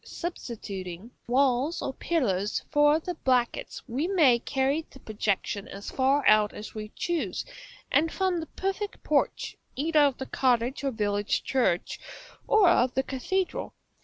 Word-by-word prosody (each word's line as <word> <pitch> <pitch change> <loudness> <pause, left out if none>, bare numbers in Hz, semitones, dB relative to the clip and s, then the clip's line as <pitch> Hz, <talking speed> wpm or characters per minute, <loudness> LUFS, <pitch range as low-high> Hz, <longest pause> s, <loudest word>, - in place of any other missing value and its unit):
Substituting 205 - -6 0.2
walls 265 +4 +2
or 270 - -3
pillars 210 - 0
for 295 0 +5
the 355 +2 -4
brackets, 255 -6 0
we 270 +8 -1
may 305 -11 +4
carry 270 +5 0
the 270 - -15
projection 205 -2 -2
as 200 +1 -8
far 275 +1 +2
out 215 -1 +5
as 210 - -8
we 215 -1 -6
choose, 300 - -2 0.5
and 320 +2 +3
form 375 -2 0
the 320 - -6
perfect 390 +4 -4
porch, - - 0 0.2
either 310 +3 +2
of 285 -3 +4
the 265 - -5
cottage 250 0 +1
or 275 - +1
village 205 -3 -1
church, 215 -10 0 0.5
or 430 -4 +5
of 260 -7 +3
the 265 - +2
cathedral. 355 +9 -2
265 Hz, 145 wpm, -27 LUFS, 215-315 Hz, 0.5 s, for